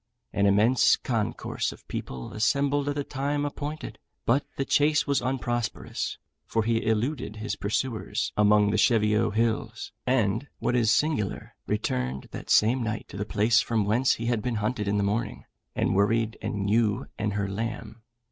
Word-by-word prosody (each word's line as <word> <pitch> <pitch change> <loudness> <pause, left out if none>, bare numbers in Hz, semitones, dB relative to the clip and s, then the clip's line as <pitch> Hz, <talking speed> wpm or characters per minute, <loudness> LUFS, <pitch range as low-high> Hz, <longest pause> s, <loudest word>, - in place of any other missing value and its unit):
An 100 0 +3
immense 110 +6 +5
concourse 115 -4 -2
of - - -15
people 65 -1 -6
assembled 140 +6 +1
at 145 - -2
the 145 - -1
time 145 +2 -2
appointed, 145 +2 -5 0.3
but 135 +5 +3
the 135 - 0
chase 150 +2 +3
was 140 -3 +1
unprosperous; 120 -3 -2 0.3
for 115 - 0
he 115 0 +1
eluded 115 +2 -1
his 110 -1 -3
pursuers 110 +2 -2
among 105 0 +4
the 110 - +1
Cheviot 105 -1 +3
Hills, 110 0 -1 0.2
and, 125 0 +1
what 125 - 0
is 115 -3 +3
singular, 140 -7 0
returned 65 +1 -2
that - - -8
same 120 +5 +4
night 110 -2 -3
to - - -10
the 105 - -2
place 110 +1 +3
from 110 -3 0
whence 120 +6 +3
he 115 - -5
had 120 -2 +1
been 125 0 -2
hunted 105 0 -1
in 100 +1 +1
the 100 - +1
morning, 105 +2 -2 0.3
and - - +1
worried 110 +3 +2
an 105 -2 -2
ewe 105 -1 +2
and 105 -1 -1
her 100 -1 -1
lamb. 110 +2 -5
110 Hz, 165 wpm, -27 LUFS, 105-125 Hz, 0.3 s, immense